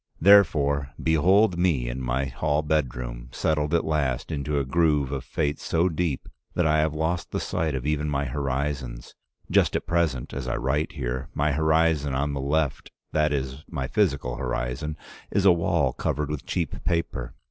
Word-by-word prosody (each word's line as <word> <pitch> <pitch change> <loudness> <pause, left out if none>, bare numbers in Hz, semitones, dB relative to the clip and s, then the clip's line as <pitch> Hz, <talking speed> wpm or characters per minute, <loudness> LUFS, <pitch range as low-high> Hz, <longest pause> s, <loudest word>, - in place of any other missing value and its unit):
Therefore 70 -8 +4
behold 90 +4 +4
me 80 -9 +2
in 60 +2 -4
my 65 +2 0
hall 75 +4 0
bedroom, 60 -5 -2
settled 75 -1 0
at 85 - +1
last 70 -4 -1
into 75 -1 -2
a 70 - 0
groove 75 -2 +2
of 70 -2 -3
fate 75 -2 -1
so 85 +2 +1
deep 80 -4 -2 0.3
that 90 - +2
I 75 0 +3
have 75 0 +1
lost 80 +3 -1
the - - -2
sight 80 -3 -1
of 65 0 -4
even 75 0 0
my 70 -1 0
horizons. 65 -2 -3 0.4
Just - - +3
at - - -1
present, 80 -7 0
as 65 -1 -4
I 60 - -1
write 70 +5 -1
here, 65 -2 -3
my 75 +1 +2
horizon 80 -1 +2
on 70 +2 0
the 70 - -2
left, 70 0 -1 0.2
that 75 -1 +2
is 65 0 -3
my 65 - -3
physical 70 - 0
horizon, 65 +4 -3 0.3
is 100 - +1
a 95 - +8
wall 85 -5 +1
covered 75 +1 -2
with 75 -1 -5
cheap 85 -6 -2
paper. 85 -1 -2
75 Hz, 175 wpm, -25 LUFS, 65-80 Hz, 0.4 s, a